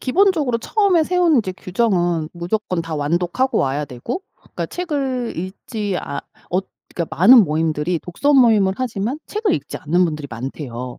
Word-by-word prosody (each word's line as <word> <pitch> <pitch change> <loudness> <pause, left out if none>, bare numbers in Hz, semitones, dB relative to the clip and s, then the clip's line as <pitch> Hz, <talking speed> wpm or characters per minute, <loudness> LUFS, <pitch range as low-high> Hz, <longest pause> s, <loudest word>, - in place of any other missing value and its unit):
기본적으로 300 -4 +2
처음에 390 - +2
세운 350 -4 +3
이제 190 -5 -1
규정은 175 -4 0
무조건 180 +1 -2
다 165 -1 -5
완독하고 175 - 0
와야 140 +2 0
되고 135 - -5
그러니까 - - -7
책을 275 -8 -2
읽지 195 +2 -4
않 140 - -5 0.3
얻 185 +2 0 0.3
그러니까 170 -2 -4
많은 230 +5 +8
모임들이 160 +1 -1
독서 280 +12 0
모임을 220 -7 +5
하지만 245 +1 -2
책을 425 -4 0
읽지 - - -5
않는 175 +4 +1
분들이 150 -3 -3
많대요. 125 0 -6
185 Hz, 365 characters per minute, -20 LUFS, 160-260 Hz, 0.3 s, 많은